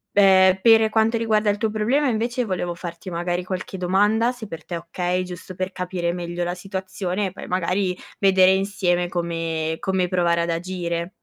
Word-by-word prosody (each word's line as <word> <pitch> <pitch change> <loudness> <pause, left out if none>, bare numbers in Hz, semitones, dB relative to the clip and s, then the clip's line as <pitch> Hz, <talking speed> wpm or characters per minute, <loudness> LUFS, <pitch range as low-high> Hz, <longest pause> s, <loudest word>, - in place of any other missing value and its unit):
Be 190 -1 +6
pere 225 -1 +6
quanto 225 +1 +2
riguarda 215 -2 +1
il 205 - +1
tuo 220 0 -1
problema, 245 +7 +1
invece, 240 +1 0
volevo 175 -3 -2
farti, 170 +1 -7
magari, 175 +1 -2
qualche 185 +1 -5
domanda, 205 +6 +2
se 245 -3 -9
per 165 -4 -8
te 175 - -5
è - - -2
okay, 175 +2 -2
giusto 180 +1 -9
per 185 +1 -3
capire 180 -2 -2
meglio 175 0 -4
la 175 0 -2
situazione, 190 +1 -3
e 185 - -6
poi, - - -9
magari, 185 +1 0 0.2
vedere 190 -1 +5
insieme 190 -3 0
come 165 -2 -2
come 190 -2 0
provare 170 -2 +2
ad 170 0 -1
agire. 170 0 -3
185 Hz, 180 wpm, -23 LUFS, 175-205 Hz, 0.2 s, Be